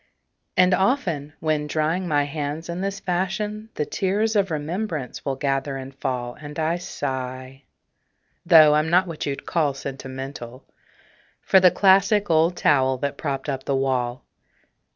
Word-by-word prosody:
And 180 0 +5
often, 180 - 0
when 155 -2 0
drying 160 +5 -1
my 145 -3 +2
hands 150 +2 -4
in 170 +2 -4
this 195 0 -3
fashion, 200 +4 -2
The 150 - -1
tears 210 +6 0
of 200 -2 +2
remembrance 155 - -4
will 135 -1 -2
gather 135 0 -1
and 135 0 -8
fall, 125 -3 -3
And 150 +1 -10
I 160 +2 0
sigh 130 -5 -5 0.8
(though 155 -2 +7
I'm 155 +1 +2
not 180 +2 +4
what 165 -4 -5
you'd 140 -1 -4
call 150 -5 0
sentimental) 135 -2 -7 0.8
For 190 - +5
the 185 -1 +7
classic 195 +1 +3
old 165 +2 +3
towel 130 -2 +3
that 140 +2 -3
propped 140 -1 -3
up 135 -2 -3
the 140 - 0
wall. 130 -2 -1
150 Hz, 150 wpm, -23 LUFS, 135-180 Hz, 0.8 s, though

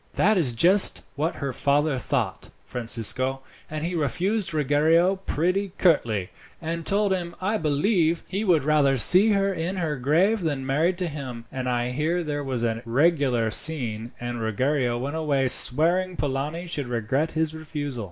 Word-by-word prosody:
"That 215 +2 +2
is 160 -10 +1
just 180 - +4
what 155 +4 -2
her 140 -2 -5
father 145 0 0
thought, 120 -7 -3 0.2
Francisco, 125 +3 0 0.3
and 155 +1 -5
he 175 - -4
refused 180 +6 -2
Ruggiero 160 +5 +2
pretty 185 +4 -1
curtly, 115 - +1 0.3
and 165 0 -5
told 205 0 +1
him, 175 -2 -5
I 205 +4 -2
believe, 165 +2 0
he 195 +3 -3
would 170 -8 +2
rather 145 -2 +2
see 190 - +8
her 195 0 0
in 175 +2 -4
her 160 -5 -3
grave 170 - +1
than 145 -5 -3
married 160 +7 0
to 180 -1 -2
him; 130 -6 -8
and 130 -1 -4
I 120 0 -2
hear 160 +6 -2
there 145 -2 -4
was 130 -4 -3
a 115 -1 -2
regular 130 -3 +1
scene, 120 -5 +1
and 120 -1 -5
Ruggiero 120 +3 -1
went 140 +6 -4
away 140 -4 0
swearing 175 +9 +4
Polani 145 +5 -3
should 145 -6 -4
regret 125 +7 -2
his 160 -1 -1
refusal." 150 -4 -6
150 Hz, 160 wpm, -24 LUFS, 130-175 Hz, 0.3 s, see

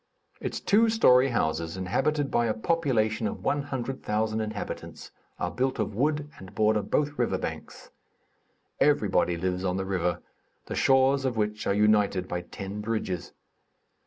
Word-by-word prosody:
Its - - -4
two 225 +3 +3
story 135 - +5
houses, 80 -7 -1
inhabited 135 +10 0
by 120 0 +2
a 110 - 0
population 110 -6 +1
of - - -6
100,000 120 -6 -1
inhabitants, 110 -2 -6 0.3
are 90 - -2
built 130 +1 -1
of 110 -2 -2
wood 145 +6 0
and 95 +1 -12
border 110 0 +3
both 145 +5 -1
river 120 - +1
banks. - - -7 0.9
Everybody 85 -1 +2
lives 90 +1 -2
on 90 0 0
the 95 - -2
river, 90 -2 -1 0.4
the - - -6
shores 135 +1 +3
of 130 -4 -1
which 105 0 -1
are 100 - +2
united 105 -3 +3
by 90 -1 -3
ten 100 +2 -7
bridges. 105 -6 -3
110 Hz, 145 wpm, -27 LUFS, 95-135 Hz, 0.9 s, story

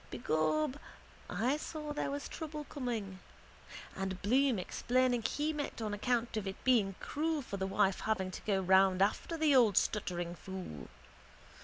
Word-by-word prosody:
Begob 205 - 0 0.5
I 255 +6 +1
saw 300 -1 -5
there 295 - -2
was 285 +1 -4
trouble 305 -1 -6
coming. 230 -10 -4 0.8
And 190 -1 -3
Bloom 255 +3 +3
explaining 245 +6 +1
he 295 +7 -1
meant 290 -4 -4
on 215 -2 -2
account 235 +2 0
of 205 -2 -2
it 190 - -3
being 215 -7 +3
cruel 310 -1 -1
for 200 - -5
the 190 0 -1
wife 195 0 +2
having 190 -4 -1
to - - -7
go 195 -2 +1
round 190 0 +5
after 270 +11 -1
the 310 -3 +4
old 225 -6 +5
stuttering 175 -5 0
fool. 175 - -7
220 Hz, 155 wpm, -33 LUFS, 190-280 Hz, 0.8 s, round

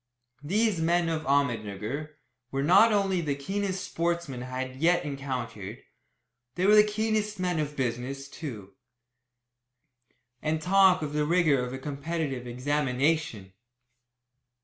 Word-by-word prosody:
These 200 +3 +1
men 170 +1 +2
of 155 -1 -3
Ahmednugger 130 +1 -1 0.3
were 135 +1 -2
not 185 +9 +6
only 195 -3 +1
the 145 -4 -1
keenest 190 +6 -3
sportsmen 170 -6 -2
I 130 +1 -3
had 160 +7 +1
encountered, 130 -6 -5 0.7
they 180 - 0
were 205 - +6
the 210 0 +8
keenest 215 -1 -1
men 180 -3 0
of 150 -1 -3
business, 130 +2 -3
too. 110 - -8 1.7
And 155 +1 0
talk 185 0 +4
of 150 -1 -4
the 150 0 +1
rigour 160 -6 +3
of 125 - -4
a 130 - -4
competitive 140 -2 -4
examination! 135 -4 -1
150 Hz, 125 wpm, -28 LUFS, 130-175 Hz, 1.7 s, the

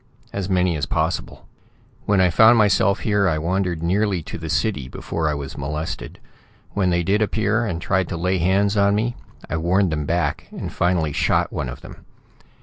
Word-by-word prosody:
As 100 -1 -3
many 90 -2 +2
as 75 - -2
possible. - - -2 0.6
"When 100 -2 +3
I 90 -2 +4
found 110 +6 +6
myself 100 -1 +3
here, 105 -3 +2
I 80 - 0
wandered 85 0 -1
nearly 95 0 +1
to 80 - -7
the 80 -1 -6
city 85 - -1
before 80 +4 -3
I 75 - -1
was 70 -1 -6
molested. 75 +3 -5 0.5
When 95 -3 +1
they 85 0 +1
did 100 +5 +1
appear, 110 +2 +1
and 85 -5 -3
tried 95 0 0
to 85 - -3
lay 90 +2 0
hands 100 +4 +2
on 100 0 +3
me, 120 +3 -1 0.3
I 80 - -2
warned 90 +3 +2
them 75 -2 -2
back, 85 +1 -1
and - - -7
finally 85 -4 +1
shot - - +1
one - - -3
of - - -8
them. - - -12
90 Hz, 190 wpm, -22 LUFS, 80-100 Hz, 0.6 s, found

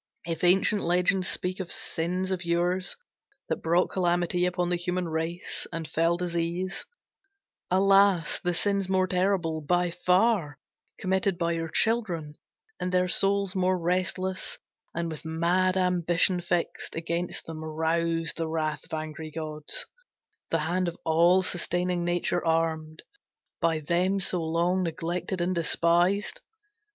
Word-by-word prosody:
If 165 0 -4
ancient 190 +3 +4
legends 180 +2 +2
speak 185 +1 -1
Of 185 -2 -4
sins 180 +3 -2
of 185 -1 -2
yours, 175 - 0 0.5
that - - -2
brought 170 +2 +2
calamity 175 0 +1
Upon 180 -1 -1
the 180 - +1
human 180 0 -1
race, 165 +2 -3
and 165 -2 -4
fell 165 +2 +1
disease, 175 +2 -2 0.8
Alas, 195 -2 +4
the 175 -1 -1
sins 200 0 0
more 190 -1 +3
terrible, 180 -4 0
by 175 +3 +1
far, 180 -3 +2 0.4
Committed 190 0 0
by 170 -1 0
your 165 -1 -2
children, 180 -8 0 0.5
and 180 - -2
their 180 0 +2
souls 195 +1 +2
More 185 0 +2
restless, 185 +2 -1 0.4
and 170 0 -1
with 155 - -7
mad 175 +4 +1
ambition 180 0 +3
fixed, 175 0 -2
Against 170 +1 -3
them 160 -1 -7
roused 165 +1 -1
the 165 -1 -1
wrath 155 -1 -2
of - - -5
angry 155 0 -6
gods, 155 -1 -4 0.6
The 165 - +1
hand 175 +3 0
of 170 - -4
all 170 +4 +4
sustaining 175 0 0
Nature 175 0 0
armed, 160 -1 -1 0.6
By 165 -2 +1
them 180 +5 +1
so 180 -2 +3
long 170 +3 +1
neglected 175 +2 -3
and 180 +2 +1
despised. 175 +4 +1
175 Hz, 135 wpm, -27 LUFS, 165-185 Hz, 0.8 s, ancient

